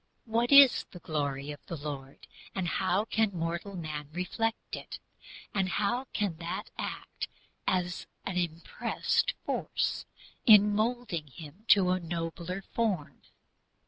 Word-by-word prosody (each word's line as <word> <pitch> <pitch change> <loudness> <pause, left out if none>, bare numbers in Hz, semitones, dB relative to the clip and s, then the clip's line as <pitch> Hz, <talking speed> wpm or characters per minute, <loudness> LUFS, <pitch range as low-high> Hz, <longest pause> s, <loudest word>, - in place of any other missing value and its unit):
What 235 +2 +1
is 280 -2 +9
the - - -11
"glory" 145 -4 -2
of 145 - -10
the 170 - -4
Lord, 140 -2 -7 0.3
and 185 -3 -1
how 190 +4 +1
can 220 -4 +1
mortal 170 +4 -3
man 155 -4 -5
reflect 220 +6 -2
it, - - -7 0.6
and 190 -2 +1
how 235 +7 0
can 205 -9 -2
that 170 +1 -5
act - - -4 0.4
as 180 -1 0 0.2
an 190 - -3
"impressed 170 -2 0
force" - - -1 0.4
in 210 -2 +8
moulding 215 -7 -1
him 155 - -12
to 185 -3 +6
a 185 - +2
nobler 170 +2 -4
form? 200 -11 -2
180 Hz, 130 wpm, -30 LUFS, 165-210 Hz, 0.6 s, is